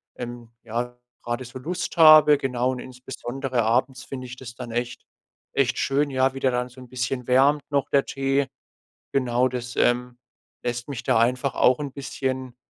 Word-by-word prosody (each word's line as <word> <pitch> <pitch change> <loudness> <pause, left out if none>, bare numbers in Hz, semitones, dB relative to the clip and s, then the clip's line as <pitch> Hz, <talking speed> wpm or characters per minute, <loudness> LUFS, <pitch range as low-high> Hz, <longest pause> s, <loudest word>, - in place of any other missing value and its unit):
ähm, 120 -1 -7
ja 120 +2 -4 0.3
grade 120 +2 -3
so 125 +2 -9
Lust 175 +6 -4
habe 155 -2 +8
genau. 125 -1 0
Und 130 - -5
insbesondere 130 0 -4
abends 125 +3 +1
finde 130 -2 -6
ich 125 +1 -9
das 120 -2 -10
dann 120 -2 -7
echt 120 +1 -3 0.5
echt 135 -3 +1
schön, 145 +2 +1
ja, 130 0 +2
wie 135 - -6
der 130 - +3
dann 125 0 -1
so 130 +1 -14
'n 125 - -13
bisschen 125 0 -3
wärmt 140 +3 +4
noch 140 -1 +1
der 140 -1 +3
Tee. 135 0 0 0.7
Genau 125 -1 +2
das, 125 -1 -5
ähm, 125 0 +1 0.5
lässt 120 +1 -3
mich 135 -5 -5
da - - +3
einfach 125 +3 +1
auch 125 0 +4
'n 145 -2 -4
bisschen, 130 -2 -4
130 Hz, 180 wpm, -24 LUFS, 120-135 Hz, 0.7 s, habe